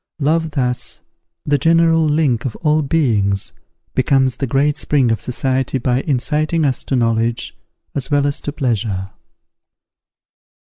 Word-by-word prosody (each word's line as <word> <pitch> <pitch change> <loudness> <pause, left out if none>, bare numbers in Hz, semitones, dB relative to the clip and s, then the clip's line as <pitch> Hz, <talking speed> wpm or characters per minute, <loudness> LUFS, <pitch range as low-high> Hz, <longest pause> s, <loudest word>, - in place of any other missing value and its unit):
Love, 160 +2 +1
thus, 125 -4 -3 0.4
the 145 -1 +2
general 165 +2 +4
link 150 -6 +1
of 130 - -4
all 155 0 +3
beings, 115 -10 +1 0.4
becomes 130 -2 +2
the 135 - -2
great 140 +4 +1
spring 135 -4 +1
of 115 - -1
society, 130 +1 -1
by 125 +1 0
inciting 150 +3 0
us 130 -3 0
to 135 - -2
knowledge 115 -1 0 0.4
as 140 +1 -3
well 145 -1 +2
as 140 0 -1
to 145 - -4
pleasure. 110 -9 -2
135 Hz, 135 wpm, -18 LUFS, 120-150 Hz, 0.4 s, general